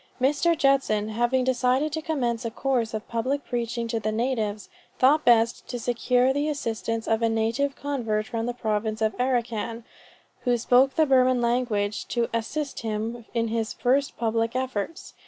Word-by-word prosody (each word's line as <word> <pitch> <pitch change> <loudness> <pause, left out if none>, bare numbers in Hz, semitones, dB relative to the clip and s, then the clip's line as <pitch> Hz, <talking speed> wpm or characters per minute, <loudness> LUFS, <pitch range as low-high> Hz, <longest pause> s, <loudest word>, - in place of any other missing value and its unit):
Mr. 295 +6 +2
Judson 270 -7 +2
having 240 +4 +1
decided 260 +3 +1
to 315 - -2
commence 255 -8 -1
a 230 - -2
course 235 -2 -1
of 215 - -5
public 260 +5 -2
preaching 235 -1 -2
to 230 -1 -1
the 215 0 -2
natives, 220 -3 -1 0.3
thought 290 +4 +4
best 230 -1 +3
to 245 - -4
secure 250 +2 +2
the 290 +2 0
assistance 230 -5 -3
of 225 0 +1
a 230 - +3
native 230 +6 0
convert 230 -7 -2
from 230 0 -3
the 245 - -1
province 220 -1 -1
of 220 -2 0
Arracan, 235 -2 -1 0.6
who 245 -2 +1
spoke 255 +3 +3
the 315 - +4
Burman 255 -2 +4
language, 235 -4 0
to 235 -1 0
assist 275 +6 -3
him 225 +1 -4
in 230 -1 +1
his 225 -1 -2
first 270 +3 +1
public 230 0 0
efforts. 255 +2 -3
240 Hz, 165 wpm, -25 LUFS, 225-260 Hz, 0.6 s, thought